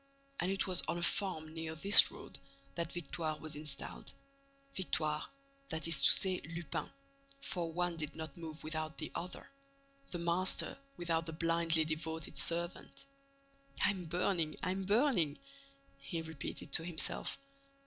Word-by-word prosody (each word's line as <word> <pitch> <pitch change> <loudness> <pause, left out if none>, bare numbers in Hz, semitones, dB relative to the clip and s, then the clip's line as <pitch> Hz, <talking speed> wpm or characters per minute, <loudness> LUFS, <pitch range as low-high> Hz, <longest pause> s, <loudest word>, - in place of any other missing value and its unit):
And 180 - +1
it 195 - 0
was 185 -2 +2
on - - 0
a 170 - -2
farm 160 -4 0
near 160 -1 -4
this 195 +6 +8
road - - -9 0.3
that 170 -1 -3
Victoire 160 -2 -3
was 155 -1 -6
installed, 150 0 -4 0.6
Victoire, 155 -5 0 0.4
that 160 +1 -2
is 160 -4 +5
to - - +8
say, 185 -2 +8
Lupin, 170 -1 -3 0.5
for 175 -10 -3
one 175 0 -1
did 150 -1 -3
not 160 0 -6
move 160 -2 -8
without 155 0 -3
the 155 - -5
other, 180 +1 -6 0.6
the 175 - -3
master 170 +2 0 0.2
without 165 -1 0
the 160 - -4
blindly 165 0 +2
devoted 160 0 -3
servant. 170 - -1 0.8
"I'm 195 -3 +2
burning! 170 -1 0
I'm 190 +1 -1
burning!" 200 - +3 0.6
he 170 - -4
repeated 160 -2 -6
to 165 - +5
himself. 165 -2 0
165 Hz, 140 wpm, -35 LUFS, 155-175 Hz, 0.8 s, this